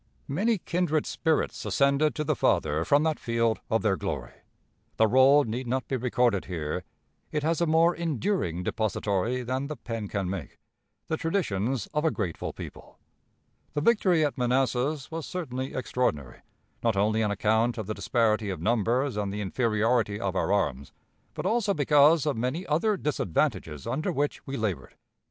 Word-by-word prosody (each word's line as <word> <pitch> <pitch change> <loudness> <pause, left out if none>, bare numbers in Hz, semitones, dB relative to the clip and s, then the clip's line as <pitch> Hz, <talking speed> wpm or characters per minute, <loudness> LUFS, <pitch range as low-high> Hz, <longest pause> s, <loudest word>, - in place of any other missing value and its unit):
Many 210 +10 +1
kindred 170 -4 0
spirits 160 -2 -1
ascended 140 +2 +2
to 150 - -1
the 155 0 0
Father 75 - +1
from 145 - +3
that 160 -1 0
field 115 -1 0
of 110 - +1
their 100 -3 +3
glory. 75 -11 -4 0.6
The 110 - +5
roll 130 +5 +6
need 120 +2 -4
not 130 -1 -1
be 135 - -1
recorded 125 -4 +1
here; 80 -5 -3 0.5
it 150 -1 -1
has 165 +2 +1
a 170 - +2
more 165 +2 +4
enduring 160 - -1
depository 110 +3 -1
than 130 +3 -2
the 150 - -5
pen 115 -4 -5
can 100 -2 -2
make 90 -5 -5 0.5
the 160 - -2
traditions 130 - -1
of 150 0 0
a 160 - +4
grateful 100 - -3
people. - - -10 0.8
The 145 - +1
victory 180 -5 +3
at 145 - -3
Manassas 130 +4 0
was 165 -1 -5
certainly 130 -7 -4
extraordinary, 120 - -2 0.4
not 115 -4 +1
only 110 +2 +2
on 105 - +1
account 110 +4 +1
of 110 - -3
the 110 - -3
disparity 110 -3 +1
of 95 - -4
numbers 120 +3 +1
and 100 -2 -2
the 105 +1 -4
inferiority 110 +1 +1
of 95 -2 -2
our 95 - 0
arms, 70 -10 0 0.4
but - - -4
also 215 -4 +1
because 150 +2 +5
of 150 - 0
many 130 +10 -2
other 195 +8 +1
disadvantages 80 - -1
under 155 +7 -1
which 145 -2 -2
we 135 0 -3
labored. 95 - -3
125 Hz, 165 wpm, -27 LUFS, 105-150 Hz, 0.8 s, roll